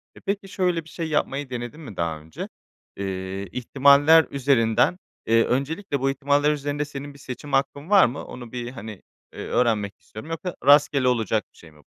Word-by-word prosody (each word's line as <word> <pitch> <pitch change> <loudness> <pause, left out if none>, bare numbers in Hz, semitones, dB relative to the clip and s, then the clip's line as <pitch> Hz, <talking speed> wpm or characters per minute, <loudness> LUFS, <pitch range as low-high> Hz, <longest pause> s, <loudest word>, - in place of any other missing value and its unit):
E, - - -13
peki, 200 0 -3
şöyle 180 -3 0
bir 160 - -16
şey 165 -2 -4
yapmayı 145 -2 -1
denedin 125 +5 -6
mi 110 - -10
daha 80 -2 -2
önce? 80 +1 -8 0.5
Eee, 95 0 -4
ihtimaller 140 +6 +5
üzerinden, 125 +1 +2 0.3
eee, 115 0 +4
öncelikle 140 - -1
bu 135 +1 +1
ihtimaller 145 +2 +2
üzerinde 145 0 -2
senin 145 0 -8
bir 140 - -16
seçim 140 +2 -8
hakkın 140 +3 0
var 200 -2 +7
mı? 125 +4 -4
Onu 120 -2 -10
bir, 120 -1 -5
hani, 110 -5 -9 0.3
eee, - - -10
öğrenmek 105 -5 0
istiyorum. 110 +9 -11
Yoksa 175 +2 -4
rastgele 145 -2 +5
olacak 110 -3 +1
bir - - -25
şey 85 - -15
mi 75 - -21
bu? - - -21
135 Hz, 185 wpm, -24 LUFS, 115-150 Hz, 0.5 s, var